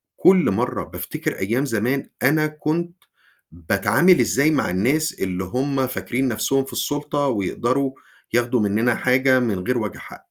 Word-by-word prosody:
كُلّ 185 - +4
مَرّة 95 - -1
بافتكر - - -5
أيام 115 +8 0
زمان، 125 +2 -1
أنا 155 +3 +3
كنت 155 +3 -3 0.6
باتعامل 100 - +3
إزاي 140 +4 +2
مع 150 - 0
الناس 135 - +1
اللي 95 -1 -2
هُم 130 +6 -1
فاكرين 130 +1 -2
نَفْسهم 135 +4 0
في - - -10
السُلطة، 145 0 -1
ويقدروا 130 +4 -1 0.4
ياخدوا 120 +1 +1
مننا 110 +4 +1
حاجة 130 +1 +3
من 110 -6 -1
غير 125 0 +1
وجه 110 -3 -4
حق. - - -11
130 Hz, 145 wpm, -21 LUFS, 110-145 Hz, 0.6 s, كُلّ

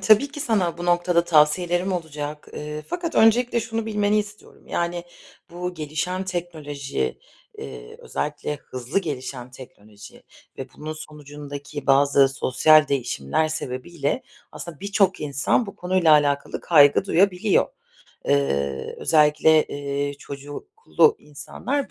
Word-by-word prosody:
tabii 220 +6 +5
ki 290 - -8
sana 185 -9 0
bu 175 - -5
noktada 175 0 +2
tavsiyelerim 175 +4 +2
olacak, 150 -3 -5
eee, 150 0 -6
fakat 335 - -4
öncelikle 235 +2 +4
şunu 225 0 -4
bilmeni 210 -1 +1
istiyorum. 210 0 -8
Yani, 175 0 -2 0.5
bu 180 +1 -5
gelişen 155 +4 -3
teknoloji, 150 - -4 0.4
eee, 60 -3 -9
özellikle 150 0 -4
hızlı 130 +6 -3
gelişen 130 -6 -5
teknoloji 105 -5 -14 0.4
ve - - -5
bunun 155 +1 -6
sonucundaki 145 -1 -9
bazı 140 0 +5
sosyal 150 +3 +4
değişimler 130 - -1
sebebiyle 145 0 -3 0.3
aslında 165 -5 -9
birçok 200 -2 +1
insan 145 - 0
bu 200 - -9
konuyla 180 -3 +3
alakalı 145 -1 +2
kaygı 145 +1 +5
duyabiliyor. 185 -1 +2 0.6
Eee, 70 -1 0
özellikle, 155 0 +4
eee, 140 0 -3
çocuklu 145 - -1
insanlar 245 - -4
155 Hz, 115 wpm, -23 LUFS, 140-180 Hz, 0.6 s, tabii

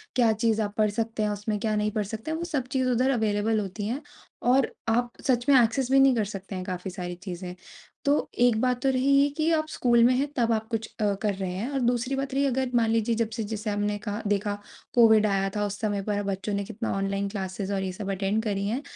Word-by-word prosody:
क्या 235 -3 +4
चीज़ 220 0 +1
आप 205 -1 -2
पढ़ 215 -1 +3
सकते 225 0 -2
हैं? 210 - +1
उसमें 210 +1 -2
क्या 215 0 0
नहीं 210 0 0
पढ़ 210 0 -1
सकते 220 +9 -5
हैं? 320 - -1
वो 340 - -4
सब 290 -7 -2
चीज़ 260 -1 +1
उधर 250 +2 +2
अवेलेबल 220 -2 +1
होती 205 +1 -4
है। 255 +6 -2 0.4
और 255 +2 +3 0.2
आप 240 +1 +1 0.2
सच 245 -2 +2
में 280 - +7
एक्सेस 250 +3 0
भी 270 - +6
नहीं 270 -1 +6
कर 220 -3 +1
सकते 195 -1 -7
हैं 185 - -4
काफ़ी 185 +1 -4
सारी 180 -1 -5
चीज़ें। 180 -1 -6 0.5
तो 285 +1 +2
एक 240 -2 +4
बात 250 -1 +1
तो 270 - +3
रही 260 +1 +1
ये 285 - +3
कि 315 +1 +2
आप 310 -1 +1
स्कूल 240 -4 +3
में 245 +2 +5
हैं 275 +3 +1
तब 235 -2 +2
आप 220 0 -2
कुछ 225 -1 -2
कर 205 0 +1
रहे 190 -2 -3
हैं, 195 +8 -3
और 275 -1 -1
दूसरी 245 +1 0
बात 270 0 -3
रही 275 +1 +2
अगर 260 -1 0
मान 230 -2 +3
लीजिए 230 0 +1
जब 225 -1 0
से 225 - -1
जैसे 215 0 -4
हमने 205 0 -1
कहा 205 +2 -2
देखा 205 0 0 0.4
कोविड 220 -3 +6
आया 195 -1 +1
था 205 0 0
उस 205 0 -4
समय 205 -2 -1
पर 205 0 -1
बच्चों 195 +1 -3
ने 200 0 -1
कितना 225 +2 -4
ऑनलाइन 195 0 -1
क्लासेस 195 0 -4
और 195 -1 -1
ये 190 - -2
सब 195 +1 -5
अटेंड 200 +3 0
करी 200 -3 -1
हैं। 240 +6 -1
220 Hz, 250 wpm, -26 LUFS, 205-245 Hz, 0.5 s, में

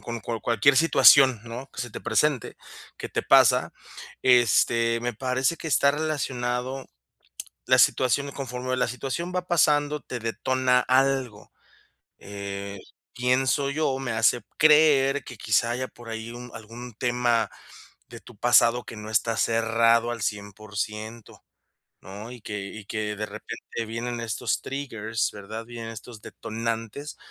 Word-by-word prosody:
con 115 -1 -6
cual 115 -1 -4
cualquier 120 +4 +3
situación, 135 -5 +6
¿no?, 120 +4 -8
que - - -7
se 120 - -5
te - - -8
presente, 150 -5 0 0.4
que - - -6
te - - -2
pasa, - - +4 0.5
este, 115 -1 +3
me 120 +1 -2
parece 130 +6 0
que 160 - -6
está 140 0 +3
relacionado 130 -4 -3 0.8
la - - +4
situación 135 +3 +3
conforme 130 -1 -4
la 125 - +1
situación 135 +9 -4
va 180 0 -2
pasando, 150 -3 +2
te 125 - -6
detona 125 +2 +1
algo. 130 -4 0 0.7
Eh, 100 0 -7 0.4
pienso 130 +3 +1
yo, 140 -2 0
me 130 -3 -3
hace 115 +1 +2 0.2
creer 150 -3 +5
que, 125 - -10
quizá, 110 +2 +1
haya 130 +1 -3
por 120 -1 -14
ahí 110 +1 -6
un 120 +1 -9
algún 115 +2 -10
tema 120 -2 +1 0.6
de - - -10
tu 120 - -16
pasado 120 +1 +4
que 115 - -10
no 105 0 -8
está 115 +1 0
cerrado 115 +1 +2
al 115 -2 -5
100%, 105 +2 -5 0.6
¿no? 105 +5 -9
Y 125 - -11
que 105 -1 -5
y 105 0 -10
que, 105 0 -3
de 105 +1 -4
repente, 115 +2 -7
vienen 120 +2 -4
estos 115 -2 -2
triggers, 115 -5 -3
¿verdad? 105 +3 -8
Vienen 115 -1 -8
estos 115 0 -11
detonantes 115 +6 -5
120 Hz, 145 wpm, -25 LUFS, 110-130 Hz, 0.8 s, situación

